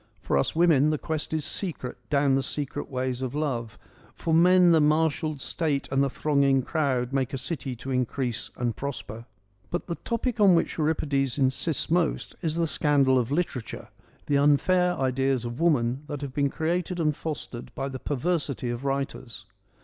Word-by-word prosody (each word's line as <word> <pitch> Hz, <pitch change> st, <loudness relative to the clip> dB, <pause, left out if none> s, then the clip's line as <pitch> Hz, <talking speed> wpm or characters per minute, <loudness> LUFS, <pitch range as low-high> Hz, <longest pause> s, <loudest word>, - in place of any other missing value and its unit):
For 90 Hz, -6 st, -1 dB
us 70 Hz, -, +1 dB
women 160 Hz, -4 st, +4 dB
the 155 Hz, -, +1 dB
quest 155 Hz, +1 st, -4 dB
is 155 Hz, -2 st, -1 dB
secret 165 Hz, -10 st, -3 dB
down 140 Hz, -2 st, +3 dB
the 135 Hz, -, +3 dB
secret 145 Hz, +1 st, -4 dB
ways 130 Hz, -1 st, -2 dB
of 130 Hz, +1 st, -3 dB
love; 120 Hz, -7 st, -2 dB, 0.4 s
for 165 Hz, -, -2 dB
men 180 Hz, +1 st, +6 dB
the 160 Hz, -2 st, +5 dB
marshalled 155 Hz, 0 st, +1 dB
state 145 Hz, -1 st, -1 dB
and 135 Hz, 0 st, +2 dB
the 140 Hz, -, +1 dB
thronging 140 Hz, -2 st, +2 dB
crowd 130 Hz, -4 st, -1 dB
make 135 Hz, -1 st, 0 dB
a -, -, -1 dB
city 130 Hz, -1 st, -4 dB
to 130 Hz, +3 st, -7 dB
increase 125 Hz, -2 st, -1 dB
and 120 Hz, -2 st, -1 dB
prosper.' 120 Hz, -4 st, -6 dB, 0.4 s
But 175 Hz, -, -3 dB
the 170 Hz, -, -3 dB
topic 230 Hz, +5 st, -3 dB
on 195 Hz, -4 st, +6 dB
which 165 Hz, -, 0 dB
Euripides 140 Hz, -4 st, 0 dB
insists 140 Hz, +4 st, 0 dB
most 170 Hz, -2 st, +1 dB
is 160 Hz, -1 st, -1 dB
the 170 Hz, 0 st, +1 dB
scandal 140 Hz, -4 st, +3 dB
of 120 Hz, +1 st, -2 dB
literature, 145 Hz, -6 st, -3 dB, 0.4 s
the 140 Hz, -1 st, +2 dB
unfair 180 Hz, +5 st, +3 dB
ideas 130 Hz, -1 st, 0 dB
of 120 Hz, +1 st, -5 dB
woman 135 Hz, -6 st, +2 dB
that 145 Hz, -1 st, -5 dB
have 140 Hz, -2 st, -5 dB
been 140 Hz, 0 st, +1 dB
created 175 Hz, +4 st, -2 dB
and 150 Hz, -3 st, +1 dB
fostered 145 Hz, -6 st, -6 dB
by 135 Hz, -, -2 dB
the 135 Hz, -1 st, -6 dB
perversity 145 Hz, -4 st, -1 dB
of 120 Hz, +2 st, -5 dB
writers. 135 Hz, -6 st, -3 dB
140 Hz, 175 wpm, -26 LUFS, 130-160 Hz, 0.4 s, men